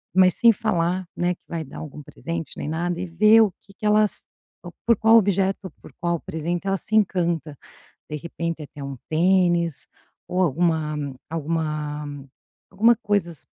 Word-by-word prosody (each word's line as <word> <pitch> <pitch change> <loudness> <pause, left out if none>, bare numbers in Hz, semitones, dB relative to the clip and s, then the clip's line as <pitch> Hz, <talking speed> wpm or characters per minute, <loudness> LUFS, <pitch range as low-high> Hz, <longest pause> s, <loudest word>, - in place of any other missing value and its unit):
mas 185 -1 +5
sem 235 -1 +6
falar, 185 -4 0
né, 175 +1 +1
que - - -44
vai 165 -2 -4
dar 140 - -11
algum 150 -1 -8
presente 165 +1 -6
nem - - -4
nada, 170 +2 -2
e 185 - -2
ver 215 +6 +6
o 210 -4 +3
que 195 - -19
que 210 - -8
ela 210 0 +5
s 210 - -3 0.6
por 230 -3 +4
qual 225 +1 +6
objeto 195 -2 +2
ou 185 - -6
por - - -14
qual 170 -1 0
presente 170 +4 -4
ela 195 0 +1
se 215 - -4
encanta, 170 -7 +1 0.5
de 150 - -3
repente 170 0 -4
até 145 -1 -10
um 140 -2 -6
tênis 175 -1 +2 0.4
ou 185 - 0
alguma, 160 -1 +1 0.3
alguma 155 -2 -2 0.6
alguma 225 +5 +4
coisas 200 - -1
175 Hz, 170 wpm, -23 LUFS, 160-195 Hz, 0.6 s, sem